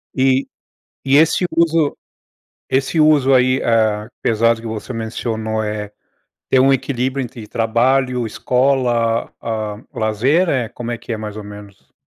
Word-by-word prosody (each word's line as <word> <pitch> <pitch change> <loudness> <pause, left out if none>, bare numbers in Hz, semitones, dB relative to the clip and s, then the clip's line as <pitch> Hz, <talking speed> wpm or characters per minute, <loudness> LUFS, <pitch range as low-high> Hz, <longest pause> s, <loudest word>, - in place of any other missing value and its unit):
E, 130 0 +2 0.6
e 135 +1 +4
esse 160 +4 +3
uso 165 -3 +2 0.8
esse 135 +4 +1
uso 145 -3 +4
aí, 130 0 +3
eh, 110 -2 +1
apesar 115 +1 +3
do 115 - -11
que 115 - -9
você 110 +3 -5
mencionou, 110 -1 -3
eh, 105 -1 -4 0.6
ter 130 - +3
um 135 +1 +5
equilíbrio 135 0 -1
entre 115 -3 -8
trabalho, 125 +3 +1
escola, 120 -1 +1
ah, 110 -2 -3 0.2
lazer, 125 - +1
eh, 130 -7 0
como 120 -1 -6
é 120 - -2
que 115 +1 -7
é, - - -1
mais 105 -1 -6
ou 105 - -7
menos? 105 -1 -13
120 Hz, 150 wpm, -18 LUFS, 110-135 Hz, 0.8 s, um